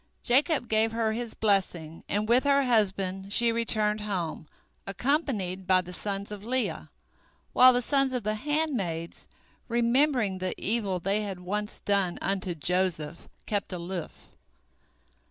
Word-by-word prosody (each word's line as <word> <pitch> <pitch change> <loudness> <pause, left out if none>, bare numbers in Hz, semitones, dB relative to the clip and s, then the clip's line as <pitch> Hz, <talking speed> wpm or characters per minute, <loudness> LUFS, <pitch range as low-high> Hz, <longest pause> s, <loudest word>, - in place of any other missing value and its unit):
Jacob 270 +1 +2
gave 220 +1 +1
her 225 -1 0
his 235 +1 -4
blessing, 180 -6 -1
and 210 +1 0
with 240 +3 +4
her 280 -1 +3
husband 195 -5 0
she 235 +2 +4
returned 215 -2 +1
home, 180 -7 -4 0.4
accompanied 195 - -1
by 185 0 +5
the 180 0 -7
sons 200 +1 -4
of 205 -1 -7
Leah, 255 +3 -2 0.6
while 255 0 +8
the 245 0 +1
sons 275 0 +2
of 250 -3 -2
the 215 +1 0
handmaids, 215 - -2 0.4
remembering 235 -3 +2
the 185 0 -2
evil 200 -4 -1
they 195 +4 0
had 195 -3 -5
once 210 +3 -4
done 195 -3 +1
unto 190 -2 -2
Joseph, 170 -1 -1 0.2
kept 205 -2 -2
aloof. 175 -1 -6
210 Hz, 135 wpm, -28 LUFS, 185-240 Hz, 0.6 s, while